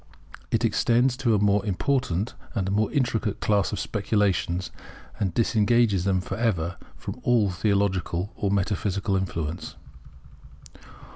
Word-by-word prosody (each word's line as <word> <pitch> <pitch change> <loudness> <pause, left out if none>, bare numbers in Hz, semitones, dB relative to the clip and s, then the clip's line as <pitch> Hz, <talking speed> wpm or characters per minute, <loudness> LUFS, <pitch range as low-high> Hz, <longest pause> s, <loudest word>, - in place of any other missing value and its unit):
It - - +1
extends 120 +2 +2
to 120 -5 +2
a - - +2
more 100 0 +3
important 105 -1 0 0.2
and 95 -3 -1
more 105 +2 +1
intricate 120 -7 0
class 100 -2 +1
of - - -3
speculations, 95 -4 0 0.5
and 95 -3 0
disengages 110 -2 +2
them 95 -2 +2
for 90 - -5
ever 90 -8 0 0.2
from - - -7
all 115 -5 +3
theological 100 -1 0
or 100 - -1
metaphysical 100 0 0
influence. 85 -4 -3
100 Hz, 125 wpm, -25 LUFS, 95-110 Hz, 0.5 s, more